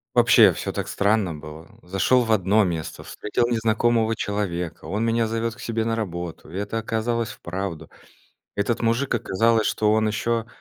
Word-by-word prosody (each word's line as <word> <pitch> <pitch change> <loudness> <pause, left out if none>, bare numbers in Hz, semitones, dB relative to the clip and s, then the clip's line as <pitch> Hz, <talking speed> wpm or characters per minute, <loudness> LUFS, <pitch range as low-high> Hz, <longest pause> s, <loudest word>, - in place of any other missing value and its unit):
вообще - - +7
всё - - -4
так - - -3
странно 100 -4 +1
было. 75 +1 -10
Зашел 95 +8 +2
в 115 - -3
одно 105 0 +3
место, 85 -4 -3
встретил 120 +3 -2
незнакомого 115 0 +2
человека, 95 -6 -3
он 105 +3 -2
меня 115 0 +1
зовет 115 +1 -2
к - - -14
себе 115 -2 -2
на 115 0 -1
работу. 85 -7 -5
И - - -7
это 105 +3 -2
оказалось 115 +1 -1
вправду. 90 -5 -6 0.7
Этот 105 +3 0
мужик, 120 +4 +1
оказалось, 115 +1 +2
что 105 -1 +2
он 110 0 +2
еще, 115 +2 -1
110 Hz, 165 wpm, -23 LUFS, 95-115 Hz, 0.7 s, вообще